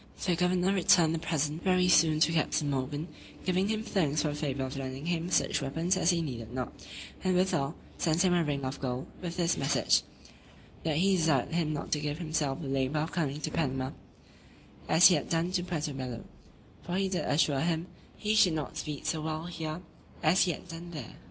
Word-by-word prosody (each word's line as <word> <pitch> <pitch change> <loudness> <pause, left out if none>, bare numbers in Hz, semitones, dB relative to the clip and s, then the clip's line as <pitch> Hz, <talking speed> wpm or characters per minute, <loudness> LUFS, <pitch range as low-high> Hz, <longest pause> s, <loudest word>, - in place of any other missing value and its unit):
The 180 -2 +2
governor 180 +2 +2
returned 170 -3 +4
the 165 - -1
present 155 -1 -1
very 185 -1 +3
soon 160 -3 +5
to 165 - +5
Captain 155 -2 +1
Morgan, 145 +4 -2 0.4
giving 185 +1 +1
him 220 0 -1
thanks 155 -9 0
for 155 - +1
the - - -3
favour 140 -3 -2
of 130 +1 -5
lending 135 +1 -5
him 170 0 -1
such - - +2
weapons 160 +7 0
as 185 -2 +2
he 170 -2 +2
needed 115 -6 -6
not; 125 -1 -4 0.5
and, 185 -1 +2
withal, 175 -5 +1 0.2
sent 165 +2 +2
him 180 - +4
a 175 -1 +3
ring 140 -3 -2
of 130 +2 -4
gold, 130 -1 -3 0.2
with 175 -1 -5
this 170 -1 +1
message, 135 - +3 0.8
"that 155 -2 0
he 190 +3 +3
desired 160 -5 +1
him 165 -2 +1
not 145 - -5
to 150 - +2
give 150 0 -3
himself 155 -3 -2
the - - -4
labour 135 +2 0
of 160 - -3
coming 150 -4 -1
to 155 - -3
Panama, 135 -4 -1 1.0
as 175 +4 +8
he - - +4
had 150 - -1
done 165 +2 0
to 185 -1 +1
Puerto 160 -5 -3
Bello: 125 -3 -5 0.6
for 175 - -4
he 195 0 +1
did 185 -1 -2
assure 145 -2 +2
him, 165 +1 0 0.3
he 215 0 0
should 190 -6 +5
not 155 -4 -4
speed 150 -2 -5
so 160 - -1
well 155 +1 -3
here, 165 -1 -5 0.4
as 170 +5 +5
he 180 - +1
had 165 - -8
done 170 0 -8
there." 150 -9 -7
160 Hz, 210 wpm, -30 LUFS, 145-175 Hz, 1.0 s, as